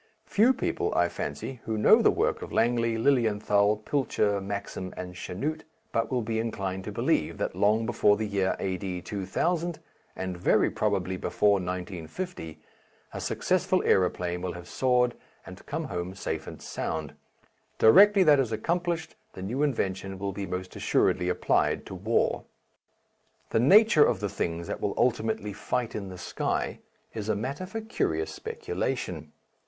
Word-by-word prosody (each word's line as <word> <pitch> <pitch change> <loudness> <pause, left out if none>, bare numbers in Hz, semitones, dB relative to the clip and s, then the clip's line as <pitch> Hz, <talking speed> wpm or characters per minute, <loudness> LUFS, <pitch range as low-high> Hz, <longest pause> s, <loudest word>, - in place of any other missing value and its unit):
Few 225 +6 +4
people, 230 - -1
I 85 0 +3
fancy, 80 - -5
who 110 -1 -2
know 105 - +6
the - - +5
work - - 0
of - - -7
Langley, 115 -1 +2
Lilienthal, 105 -4 +2
Pilcher, 105 -7 +1
Maxim, 100 -2 -5
and 90 0 -6
Chanute, 145 - -4 0.3
but 115 -1 0
will 125 -2 0
be 110 0 -1
inclined 95 -4 -3
to - - -4
believe - - 0
that - - -2
long 110 +2 +2
before 105 -3 +3
the 110 - -2
year 100 -2 0
A.D. 95 -1 -3
2000, 165 - -1 0.4
and 95 -1 -4
very 85 - +2
probably 95 -3 -1
before 100 +1 +2
1950, 90 - -5 0.5
a - - -5
successful - - +1
aeroplane 90 -1 +1
will 90 -1 -3
have 90 0 -9
soared 125 -2 +2 0.3
and - - -11
come - - -3
home 90 +1 -4
safe 80 -5 -4
and - - -9
sound. 80 -2 -4 0.6
Directly 200 - +7
that 150 -4 +6
is 125 -4 0
accomplished 170 +7 -1 0.2
the 95 - -8
new 120 +9 -2
invention 95 -9 -1
will 100 0 -3
be 100 0 -4
most 90 0 -5
assuredly 90 - +1
applied - - +1
to - - -8
war. 105 +5 0 1.1
The - - +3
nature 190 - +7
of - - +1
the 105 0 -2
things 85 -1 -3
that - - -5
will - - -1
ultimately 110 -4 0
fight 120 +3 -2
in 100 -2 -5
the 90 - -8
sky 90 - -2 0.3
is 110 -1 -5
a 110 - +2
matter 135 - -4
for 225 +4 -5
curious 220 +1 -1
speculation. 445 -1 -4
105 Hz, 155 wpm, -28 LUFS, 95-130 Hz, 1.1 s, Directly